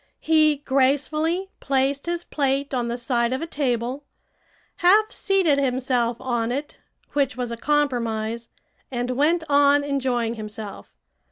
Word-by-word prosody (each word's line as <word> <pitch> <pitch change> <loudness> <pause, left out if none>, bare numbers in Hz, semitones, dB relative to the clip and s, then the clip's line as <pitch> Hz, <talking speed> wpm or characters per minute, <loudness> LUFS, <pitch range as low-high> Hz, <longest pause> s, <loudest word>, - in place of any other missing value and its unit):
He 310 -1 +4
gracefully 305 +7 +1
placed 275 +2 0
his 345 0 -2
plate 275 -1 -1
on 245 -2 0
the 235 +1 -2
side 240 -1 0
of 260 - -1
a - - -1
table, 260 -3 -2 0.7
half 425 +5 +4
seated 375 -8 +2
himself 250 -3 0
on 240 -2 -1
it, 285 +4 -5 0.3
which 280 -3 0
was 245 -2 -3
a - - -3
compromise, 235 -5 -1 0.4
and 245 -1 -2
went 310 +6 +2
on 285 0 +4
enjoying 255 -5 -1
himself. 215 - -8
270 Hz, 135 wpm, -23 LUFS, 240-295 Hz, 0.7 s, He